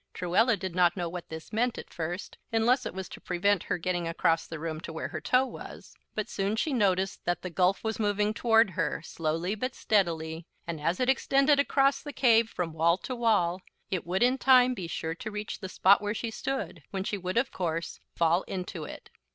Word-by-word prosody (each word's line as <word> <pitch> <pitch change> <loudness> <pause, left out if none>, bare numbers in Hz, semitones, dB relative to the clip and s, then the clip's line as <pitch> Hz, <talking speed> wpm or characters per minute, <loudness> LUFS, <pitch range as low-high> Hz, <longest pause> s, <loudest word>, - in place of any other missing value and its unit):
Truella 205 +6 +2
did 190 -2 -5
not 175 0 +3
know 175 -2 -1
what 175 +1 -7
this 160 +4 -9
meant, 235 +2 +1
at - - -9
first, 175 +2 -5
unless 235 +3 +2
it - - -6
was 190 -1 -5
to - - -10
prevent 185 +1 +1
her - - -1
getting 175 0 -2
across 165 0 +1
the 165 - -6
room 160 0 -4
to - - -7
where 160 - -4
her 155 - -5
toe 255 - +3
was; - - -10 0.2
but 215 -1 -2
soon 200 +2 -1
she 280 +6 0
noticed 195 -5 +1
that 175 0 -1
the 180 - -4
gulf 185 +3 +2
was 220 0 -2
moving 210 0 +1
toward 225 -2 +4
her, 170 -2 -2
slowly, 165 +4 -2
but 255 +5 -3
steadily; 165 -5 0 0.2
and, 165 -3 -5
as 165 +4 0
it 255 - +1
extended 275 +2 +3
across 275 -1 +3
the 295 - -7
cave 230 -3 +4
from 175 -6 -3
wall 165 +2 +3
to 255 +6 -5
wall, 205 -7 +2 0.3
it 185 -4 -1
would 185 +6 0
in 255 +2 +3
time 255 -1 +6
be 185 -8 -5
sure 160 0 -3
to 180 - -6
reach 210 0 -5
the 190 - -6
spot 195 +2 +5
where 210 +1 -2
she 230 +1 -3
stood, 265 -8 -4
when 190 -1 -3
she 205 0 -3
would, 185 +3 -3
of 265 +3 +2
course, 170 -2 -3 0.2
fall 170 +2 +3
into 180 -4 -5
it. - - -10
190 Hz, 215 wpm, -29 LUFS, 170-225 Hz, 0.3 s, time